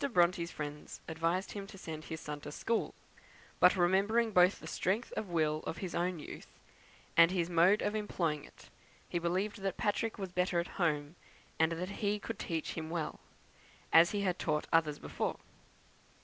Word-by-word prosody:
Bronte's 175 -1 +3
friends 150 -2 -6
advised 165 +4 -1
him 200 -1 -6
to 195 - -11
send 160 -3 -7
his 160 -1 -5
son 150 -1 -6
to 150 - -7
school; 225 +9 -1 0.6
but, 180 - +7
remembering 200 +6 +3
both 180 0 +5
the - - -11
strength 210 +6 -1
of 210 - -3
will 155 -3 +1
of 160 - -3
his 185 -4 -5
own 175 +1 0
youth 150 - -9 0.7
and 170 0 +8
his 180 -2 -1
mode 175 +5 +5
of 205 - 0
employing 170 -8 -1
it, - - -16 0.4
he 175 - -1
believed 185 +5 -1
that 195 -1 -2
Patrick 215 +2 0
was 190 -3 -5
better 180 -1 +1
at 170 - -1 0.2
home, 150 -1 0 0.4
and 160 +1 +3
that 180 +3 -3
he 205 -1 +2
himself 210 - -4
could - - -5
teach 165 -2 -2
him 160 -1 -5
well, 165 -2 -3 0.7
as 165 +1 +8
he 205 +1 -1
had 185 -2 0
taught 150 -2 0
others 155 -3 +3
before. - - -3
175 Hz, 180 wpm, -33 LUFS, 160-195 Hz, 0.7 s, and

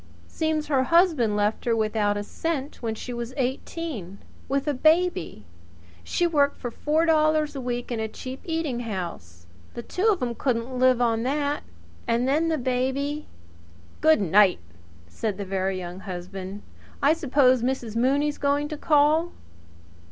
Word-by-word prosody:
Seems 315 -1 -1
her 270 -3 +1
husband 315 - +3
left 210 +1 0
her 235 -1 +2
without 215 -2 +1
a 205 - -3
cent 290 +4 -4
when 225 -2 -2
she 245 +3 -6
was 240 +1 -5
eighteen 260 - -4 0.3
with 275 +2 0
a 295 - +2
baby. 315 - +1 0.6
She 350 - 0
worked 285 -4 +2
for 245 - -5
four 310 +6 +1
dollars 310 -2 +2
a 270 - -4
week 245 0 -3
in 235 - -2
a 220 - -1
cheap 255 +4 -8
eating 320 -7 -2
house. 170 - -6 0.3
The 235 - -5
two 375 - -1
of 420 -4 +3
'em 240 -1 -1
couldn't 250 0 -2
live 255 -1 +4
on 230 -2 +2
that. 285 +3 -1 0.5
Then 265 +8 +2
the 320 - +1
baby 265 +3 -1 0.4
" 85 0 -25
"Good 315 -5 +5
night!" 195 +1 +5 0.5
said 195 - -3
the 200 - -4
Very 190 0 -1
Young 180 0 -6
Husband. 190 +2 -7 0.4
"I 290 +3 +6
suppose 275 -5 +3
Mrs. 245 -3 -2
Mooney's 280 +5 +1
going 285 +1 +1
to 305 - -5
call?" 305 +3 +3
255 Hz, 160 wpm, -25 LUFS, 215-300 Hz, 0.6 s, I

